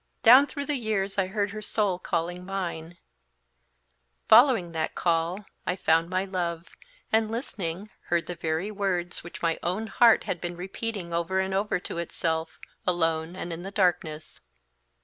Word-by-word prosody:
Down 255 +5 +8
through 285 -1 -5
the 295 -1 0
years 205 -4 -1
I 190 - +2
heard 205 +1 -1
her 215 +1 -6
soul 205 -4 0
calling 175 +1 -2
mine; 175 -3 -4 1.3
following 230 -11 +6
that 160 -1 -2
call, 170 +4 0 0.2
I 180 - -1
found 165 -2 +2
my 185 +1 0
love, 175 -3 -3 0.4
and 220 0 +3
listening, 205 - -4
heard 170 -1 0
the 180 - -4
very 165 +4 -2
words 185 -4 -2
which 175 0 -10
my 165 -1 +1
own 185 +6 -1
heart 230 +2 +5
had 175 - -3
been 175 0 -4
repeating 190 -1 -4
over 170 +3 0
and 190 0 -1
over 195 -1 0
to 170 - -5
itself, 165 -1 -2 0.3
alone 165 -1 +1
and 175 -2 -5
in 165 - -6
the 190 - -6
darkness." 175 -6 -1
180 Hz, 160 wpm, -27 LUFS, 170-205 Hz, 1.3 s, Down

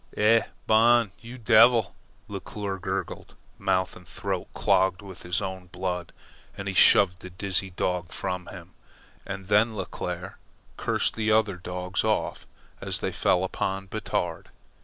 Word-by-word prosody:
"Eh? 115 +2 +5 0.2
Bon, 115 -1 +5
you 120 +3 -10
devil!" 115 -1 +5 0.3
Leclere 100 -2 -5
gurgled - - -4 0.2
mouth 95 -1 0
and 90 - -14
throat - - -4
clogged 95 +1 +2
with 95 -2 -10
his 90 +3 -2
own 95 -1 -5
blood, 90 -1 -4 0.5
as 100 - -5
he 100 - -2
shoved 95 -1 +6
the 95 - -8
dizzy 95 +1 -1
dog 90 -1 -2
from 90 -1 -4
him. 90 -1 -10 0.6
And 95 -1 -6
then 105 +2 +3
Leclere - - -5 0.4
cursed - - 0
the 110 -1 0
other 110 -3 +3
dogs 90 +1 -3
off 110 -1 -1 0.3
as - - -1
they - - -1
fell 90 0 +2
upon 95 +1 -2
Batard. - - -3
95 Hz, 140 wpm, -26 LUFS, 90-110 Hz, 0.6 s, shoved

